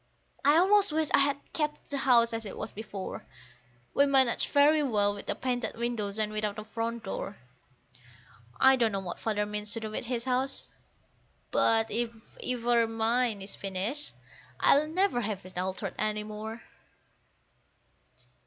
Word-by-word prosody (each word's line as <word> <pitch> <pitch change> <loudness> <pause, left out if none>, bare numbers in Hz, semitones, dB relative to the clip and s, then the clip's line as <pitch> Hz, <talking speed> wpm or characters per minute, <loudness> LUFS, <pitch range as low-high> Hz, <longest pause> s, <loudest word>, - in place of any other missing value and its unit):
I 290 +3 +5
almost 395 +1 +4
wish 310 0 +1
I - - +6
had 280 0 +2 0.2
kept 300 -2 -3
the 280 - -1
house 235 -3 +4
as 225 0 -2
it 205 - -6
was - - -4
before; 205 -2 -7 0.7
We 280 - +4
managed 265 -4 +3
very 295 +2 +5
well 210 -7 +2
with 205 - -9
a 205 - 0
painted 245 0 -2
window 235 -4 -2
and 215 -1 0
without 215 0 -2
a 215 - -5
front 230 +1 -4
door. 195 0 -5 1.2
I 265 0 +6
don't 230 -3 +2
know 195 - -1
what 185 -2 -6
Father 210 -2 -1
means 210 0 -4
to 230 - -3
do 220 -1 -5
with 220 - -3
his 240 -1 -2
house, 260 +1 -1 0.8
but 225 0 +3
if 235 +2 0 0.3
ever 240 -2 +2
mine 225 -1 +1
is 195 - -8
finished, 195 - -3 0.4
I'll 295 +2 +5
never 355 -5 +1
have 200 -4 -4
it 185 - -13
altered 185 +1 -3
any 215 0 0
more. 215 +2 -7
230 Hz, 160 wpm, -29 LUFS, 210-265 Hz, 1.2 s, I